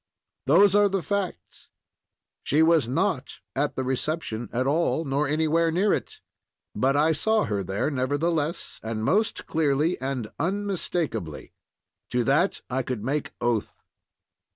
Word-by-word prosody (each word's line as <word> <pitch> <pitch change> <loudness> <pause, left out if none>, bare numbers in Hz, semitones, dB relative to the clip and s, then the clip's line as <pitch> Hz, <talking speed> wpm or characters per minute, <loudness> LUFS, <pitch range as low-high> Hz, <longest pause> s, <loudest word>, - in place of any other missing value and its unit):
Those 185 +7 +6
are 205 0 +5
the 195 -2 -1
facts. 190 - -4 0.7
She 155 +3 +3
was 160 -6 +4
not 155 +1 -1 0.2
at 145 +2 0
the 130 - -1
reception 130 -4 -2
at 125 +2 0
all, 155 0 0
or 145 +2 +1
anywhere 160 +2 +2
near 190 +5 +2
it; - - -4 0.5
but 135 +5 +1
I 155 +2 +4
saw 220 +8 +2
her 105 -3 -1
there 95 - -2
nevertheless, 145 +4 -1
and 110 -1 -4
most 215 - +1
clearly 155 +1 +1
and 130 -5 -3
unmistakably. 175 - -2 0.6
To 125 0 +1
that 150 +10 +2
I 130 +1 -1
could 125 -4 -4
make 145 +4 -2
oath. 120 -3 -1
150 Hz, 135 wpm, -25 LUFS, 130-170 Hz, 0.7 s, Those